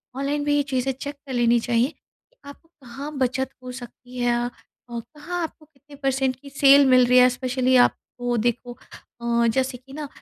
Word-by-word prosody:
online 280 +2 -1
भी 290 0 +1
ये 290 - +2
चीज़ें 260 0 0
चेक 285 +3 -7
कर 280 -2 -10
लेनी 240 -1 +3
चाहिए 235 +2 +1
कि, - - -27
आपको 285 +3 -13
कहाँ 275 +5 -7
बचत 260 0 0
हो 250 - -7
सकती 250 0 -11
है 240 0 +2 0.5
और 235 -1 -5
कहाँ 345 +4 -4
आपको 315 -1 -8
कितने 290 -1 -18
परसेंट 265 -1 +1
की 280 +3 -14
सेल 275 0 +6
मिल 255 -1 +6
रही 250 +1 +5
है, 250 0 +7
स्पेशली 255 0 0
आपको 245 -1 +1
देखो 240 +2 -2 0.4
अ, 235 0 +2
जैसे 260 +2 0
कि 265 +2 -17
ना 300 0 -5
260 Hz, 190 wpm, -23 LUFS, 245-280 Hz, 0.5 s, है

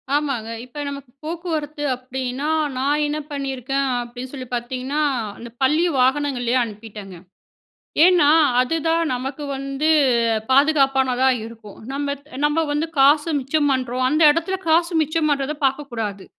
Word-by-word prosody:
ஆமாங்க, 275 -7 -1 0.2
இப்போ 255 +4 -10
நமக்கு 280 -3 -9
போக்குவரத்து 315 -3 -4
அப்பிடின்னா, 255 +2 -4 0.3
நான் 290 +3 +1
என்ன 295 +1 -2
பண்ணியிருக்கேன் 275 -1 -2
அப்படின்னு 245 +2 -8
சொல்லி 260 -2 -7
பார்த்தீங்கன்னா, 255 +4 -3 0.4
அந்த 235 - -9
பள்ளி 300 +6 +3 0.2
வாகனங்கள்லயே 260 -2 +1
அனுப்பிட்டங்க. 210 -3 -9 0.9
ஏன்னா, 350 -5 +5 0.3
அதுதான் 325 +5 +1
நமக்கு 270 +4 -5
வந்து 275 +3 -2 0.6
பாதுகாப்பானதா 270 -2 +3 0.2
இருக்கும். 225 -3 -12
நம்ப 280 0 -2 0.3
நம்ப 295 +2 +2
வந்து 300 +2 0
காச 290 +2 +5 0.2
மிச்சம் 290 +3 0
பண்ணுறோம். 255 -1 -1
அந்த 305 +4 +2
இடத்துல 335 +5 0
காசு 335 +2 +3
மிச்சம் 310 +1 0
பண்ணுறத 280 +1 0
பாக்கக்கூடாது. 240 -8 -2
275 Hz, 120 wpm, -21 LUFS, 255-300 Hz, 0.9 s, ஏன்னா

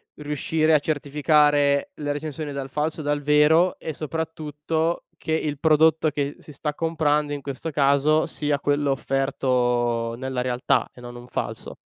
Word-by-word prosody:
riuscire 155 +2 0
a 150 - +6
certificare 145 -1 +2
le 145 -1 -3
recensioni 150 0 -5
dal 135 -1 -5
falso 150 +4 -2
dal 145 0 -1
vero, 150 +5 +4
e 160 - -5
soprattutto, 160 +1 -3
che 160 - -3
il 150 -3 -1
prodotto 160 0 +4
che 145 0 -2
si 150 - -13
sta 150 +2 -3
comprando, 150 -2 0
in 145 - -5
questo 140 +4 -5
caso 140 +2 +3
sia 145 -1 -1
quello 145 0 +1
offerto 125 -4 0
nella 130 0 -3
realtà 125 0 0
e 125 - -14
non 120 0 -9
un 120 0 -11
falso. - - -5
145 Hz, 150 wpm, -24 LUFS, 135-155 Hz, -, a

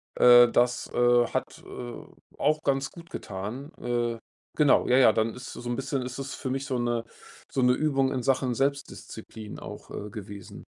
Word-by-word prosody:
äh, 120 -1 +8
das, 125 0 +2
äh, 120 0 +4
hat, - - -4
äh, 120 -1 -8 0.3
auch 155 +1 +1
ganz 135 -1 0
gut 170 -1 -13
getan. 110 - -6
Äh, 120 -1 -1 0.4
genau. 150 -3 +4
Ja, 125 - +5
ja, 125 -4 +6
dann 110 0 0
ist 125 0 -9
so - - -8
'n 120 - -1
bisschen 135 0 -2
ist 125 +2 -6
das 135 0 -5
für 130 - -5
mich 135 +1 -2
so 130 -3 -2
'ne 120 -1 -1 0.4
so 130 - -1
'ne 125 0 +5
Übung 135 -1 +1
in 130 -2 -1
Sachen 130 -1 +1
Selbstdisziplin 135 -5 -4
auch, - - -9
äh, 105 0 -6
gewesen. 100 -1 -9
125 Hz, 185 wpm, -27 LUFS, 120-135 Hz, 0.4 s, äh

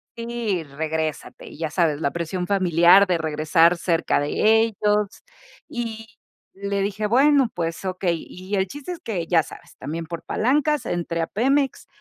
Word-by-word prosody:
sí, 230 -6 -3
regrésate. 155 +1 -4
Y - - -12
ya 160 -2 -2
sabes, 160 -3 0
la 140 - +1
presión 175 +2 -3
familiar 185 0 +5
de 180 -3 0
regresar 160 +2 +3
cerca 170 -3 +1
de 145 - -2 0.3
ellos. 210 -2 0 0.5
Y 225 -2 -5 0.5
le 200 0 -3
dije: 205 +2 -2
"Bueno, 270 +1 +4
pues, 165 +2 -4
okey". 180 -3 -2
Y 185 +3 -6
el 190 0 +1
chiste 290 - -7
es 340 - -9
que, 175 -7 -4
ya 165 -3 +3
sabes, - - -14
también 160 +4 -5
por 170 -1 -6
palancas 295 +5 +1
entré 170 -1 -2
a 165 - -1
Pemex 270 +5 0
185 Hz, 160 wpm, -23 LUFS, 165-220 Hz, 0.5 s, familiar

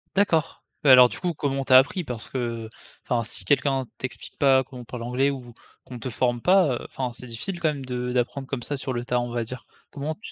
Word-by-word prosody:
D'accord. 170 -6 +1 0.2
Beh 145 - +4
alors 125 -1 +10
du - - -7
coup 175 -2 0
comment 135 -2 -1
tu 130 - -6
as 130 - +11
appris? 145 +7 +3
Parce 125 -6 -6
que 115 -3 -3 0.4
enfin 120 -2 +1
si 100 -3 -2
quelqu'un 135 0 +2
t'explique 130 - -7
pas, 135 -2 +5
comment 125 -1 -10
on 120 - -11
parle 120 0 -7
anglais, 125 +3 +1
ou 125 -4 -6 0.3
qu'on 125 -2 -9
te 130 - -4
forme 120 0 0
pas. 180 -5 +4
Heu, - - -7
enfin 130 -2 -3
c'est 125 - -10
difficile 170 - -3
quand 160 - +3
même 140 -3 -4
de 125 0 -3
d'apprendre 125 +2 -1
comme 130 -3 -4
ça 145 - -2
sur 135 -1 -3
le 120 -1 -3
tas, 125 0 +1
on 120 - -4
va 120 -1 -2
dire. 125 +1 -8 0.3
Comment 150 +2 -4
tu 215 - -10
130 Hz, 250 wpm, -25 LUFS, 120-140 Hz, 0.4 s, as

